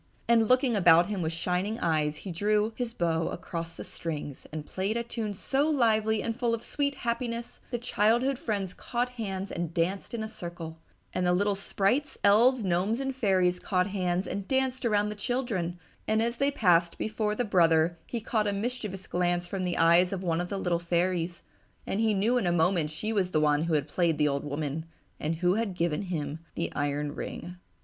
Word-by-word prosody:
And, 230 -2 +4
looking 255 -1 +3
about 175 -3 +6
him 200 -3 -2
with 160 -1 -1
shining 180 +6 -1
eyes, 155 -2 +1
he 190 - -3
again 170 - -7
drew 210 +1 +2
his 245 -1 -3
bow 165 -6 0
across 165 -2 -5
the - - -5
strings 150 -4 -6
and 155 -1 -5
played 195 +7 -2
a 235 - -1
tune 225 -3 -4
so 280 +9 +1
lively 220 -6 +2
and 230 - -2
full 240 -2 +1
of 230 - -9
sweet 280 +1 -1
happiness 235 0 -3
the 240 - -1
childhood 240 +3 +2
friends 200 -5 -2
caught 245 0 -2
hands 195 -5 -4
and 170 -2 -4
danced 185 +7 -1
in 220 - -3
a - - -3
circle, 170 -5 -7 0.3
and 185 - 0
the 180 - +4
little 205 +3 +2
sprites, 205 +8 0
elves, 235 +4 +5
gnomes 190 +5 +1
and 270 -1 -2
fairies 185 -6 +2
caught 180 0 +1
hands 185 -2 -1
and 195 -1 -4
danced 265 -1 0
around 210 -2 +2
the 210 - -5
children, 210 -8 -2 0.3
and 220 0 +2
as 235 +1 0
they 275 +2 +2
passed 175 -10 +3
before 215 -1 -1
the 245 - 0
brother 170 -3 +3
he 235 - -3
caught 215 -1 0
a 205 - 0
mischievous 210 -3 -3
glance 175 0 0
from 190 +1 -3
the 180 - -1
eyes 170 +2 +5
of 190 -1 -3
one 170 -1 +1
of 175 - -4
the 200 - -2
little 175 -3 0
fairies, 175 0 -1 0.4
and 195 - -2
he 220 -2 +2
knew 230 +6 +2
in 190 - -1
a - - +3
moment 170 -1 +2
she 215 +9 -3
was 195 -4 +1
the 155 - +1
one 150 +1 +3
who 165 -2 +1
had 145 -1 0
played 165 0 +1
the 150 0 +3
old 140 -1 -1
woman, 145 +1 -3 0.4
and 155 +2 -1
who 175 +2 +2
had 215 -3 -1
given 165 -3 0
him 160 -5 -3 0.2
the 170 - -2
iron 145 0 -1
ring.... 175 +2 -6
190 Hz, 205 wpm, -28 LUFS, 170-225 Hz, 0.4 s, about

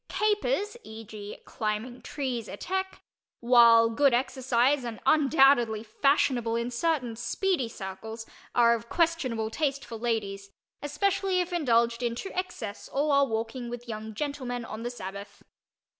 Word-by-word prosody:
"Capers" 425 +1 0
(e. 220 +1 -9
g. 210 -1 -8
climbing 220 +3 -3
trees, 250 -6 -4
etc.), 380 - -2 0.5
while 235 -1 +6
good 275 +1 +4
exercise 260 +1 +1
and 230 -3 -5
undoubtedly 270 -7 +4
fashionable 240 0 +1
in 235 +1 -2
certain 250 -3 0
"speedy" 255 - -1
circles, 220 +3 -7 0.3
are 235 -1 +6
of 235 0 -4
questionable 265 -10 0
taste 280 0 -1
for 230 - -7
ladies, 205 -4 -2 0.3
especially 380 +5 0
if 360 0 -2
indulged 235 -7 +2
in 235 -1 -1
to 385 +10 -6
excess 355 - -5
or 290 +2 0
while 280 -1 +4
walking 230 +2 -3
with 240 0 -7
young 220 -1 -6
gentlemen 255 -3 -3
on 220 0 -7
the 240 - -3
Sabbath. 200 -3 -8
240 Hz, 140 wpm, -28 LUFS, 225-285 Hz, 0.5 s, while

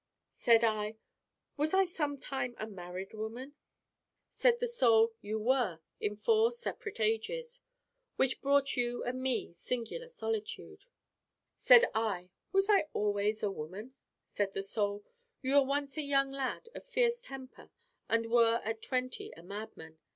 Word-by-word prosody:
Said 230 -1 +4
I: 215 -1 0 0.6
'Was 310 +5 +1
I 385 0 +5
sometime 285 -7 -3
a 215 - -4
married 185 -2 -7
woman?' 230 +6 -6 0.8
Said 480 -1 +3
the - - +1
Soul: 230 - +4
'You 215 +1 -3
were 230 -7 +1 0.2
in 210 0 -1
four 445 - +3
separate 475 - -5
ages. 475 - -1 0.5
Which 265 -1 +1
brought 280 0 +3
you 245 -1 -1
and 255 +1 -3
me 260 -8 -1
singular 250 - -4
solitude.' 450 -3 -5 0.7
Said 485 -1 +7
I: 195 -5 -1 0.2
'Was 390 +1 +3
I 405 -7 +4
always 210 +1 0
woman?' 195 +5 -4 0.3
Said 200 -1 -2
the 195 - -1
Soul: 205 0 -1 0.4
'You 260 +1 0
were 285 - +7
once 280 +1 -2
a - - +1
young 275 -1 +2
lad 275 - -3
of - - -8
fierce 485 -1 +1
temper 270 - -10 0.4
and 230 0 +1
were 230 -1 +5
at 220 0 -3
twenty 255 -1 -2
a 165 - -12
madman. 185 -5 -8
245 Hz, 145 wpm, -32 LUFS, 215-300 Hz, 0.8 s, Said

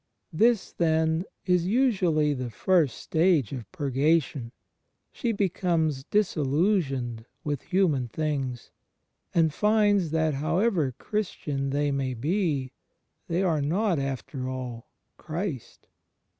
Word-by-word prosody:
This 225 +5 +3
then 160 +1 +1 0.2
is 180 -2 +2
usually 190 - +2
the 125 -3 -4
first 150 - +2
stage 160 - +2
of 125 -4 -7
Purgation; 145 -4 0 0.6
she 235 - -1
becomes 170 -8 0
disiUusioned 145 - 0 0.2
with 145 -3 -2
human 165 -10 +1
things, 135 -3 -3 0.6
and 160 -3 +3
finds 205 -4 +3
that 160 0 +1
however 165 - +1
Christian 150 -10 -3
they 145 +1 0
may 135 -2 -1
be, 145 - -1 0.6
they 175 +3 0
are 160 -5 +1
not, 175 +4 +1
after 135 -1 -4
all, 125 -3 -6 0.3
Christ. 160 - -5
155 Hz, 105 wpm, -27 LUFS, 135-185 Hz, 0.6 s, This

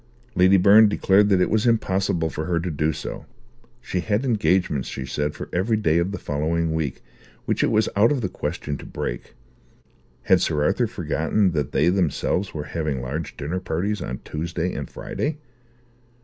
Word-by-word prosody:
Lady 95 +1 +5
Byrne 105 +3 +7
declared 100 0 +3
that 95 -2 +4
it - - +2
was 110 +2 +2
impossible 95 -7 +1
for 80 - -4
her 85 0 0
to 90 +1 -3
do 75 +1 0
so: - - -7 0.5
she 95 -6 -3
had 105 +7 0
engagements, 95 - +1
she 65 - -5
said, 75 +2 -2
for - - -7
every 105 +5 +1
day 85 -6 +2
of 85 +3 0
the 100 - -4
following 80 +3 -1
week, 80 -4 -3 0.4
which - - 0
it - - +3
was 110 -1 +2
out 105 +5 +5
of 140 -4 0
the 100 - 0
question 75 -4 -4
to - - -10
break. - - -5 0.9
Had - - +4
Sir 75 -1 +1
Arthur - - +2
forgotten 100 -4 0
that 75 -5 -2
they 75 +4 +2
themselves 90 +1 0
were 75 - -5
having 75 -4 -3
large 70 +6 -5
dinner 80 +6 -3
parties 95 +4 -2
on 65 0 -4
Tuesday 85 +3 -3
and 70 -3 -5
Friday? 150 +1 -4
90 Hz, 180 wpm, -23 LUFS, 75-100 Hz, 0.9 s, Byrne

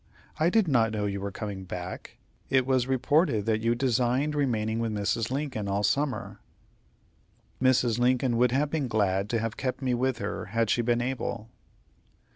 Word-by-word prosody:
I 160 +2 +4
did 220 -1 +3
not 115 -6 +3
know 105 -1 -2
you 100 -1 -3
were 100 - -3
coming 100 -1 -6
back. 90 0 -7 0.3
It 130 -1 +3
was 130 -2 +1
reported 130 - +2
that 110 -1 +1
you 115 +1 +2
designed 125 +3 +1
remaining 115 -6 0
with 115 -1 -1
Mrs. 105 +2 -1
Lincoln 130 -6 -3
all 100 +1 0
summer." 140 +7 -1 1.2
"Mrs. 125 -3 +3
Lincoln 125 0 +2
would 125 0 +3
have 145 +3 +1
been 150 -5 -1
glad 100 -3 0
to 115 - +1
have 115 +1 -3
kept 130 -1 -2
me 130 -2 0
with 125 +1 0
her - - -4
had 115 -1 0
she 120 - +2
been 120 0 +1
able." 120 -3 -3
120 Hz, 175 wpm, -27 LUFS, 110-130 Hz, 1.2 s, I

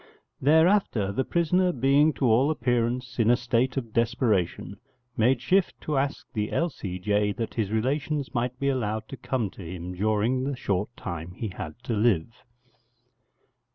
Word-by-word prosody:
Thereafter 160 - +3
the 120 +6 0
prisoner 180 +3 +2
being 140 +3 +3
to 135 - -1
all 125 +5 +4
appearance 125 -4 -1
in 115 -1 +4
a 120 - +6
state 120 +2 0
of 115 -5 -4
desperation, 110 -6 0 0.4
made 120 +3 +3
shift 190 +3 +2
to 155 - -2
ask 135 +1 -1
the 105 -1 -2
L.C.J. 105 - -1
that 115 0 -4
his 110 -4 -1
relations 135 +6 -1
might 125 +1 -2
be 140 - +1
allowed 110 -5 -2
to 135 - -7
come 115 -7 -2
to - - -12
him 90 +1 -6
during 110 +6 +1
the 140 +1 -2
short 100 -4 -1
time 85 -1 -6
he 110 +4 -4
had 90 -5 -7
to 120 - -2
live. 110 -2 0
120 Hz, 155 wpm, -26 LUFS, 105-135 Hz, 0.4 s, a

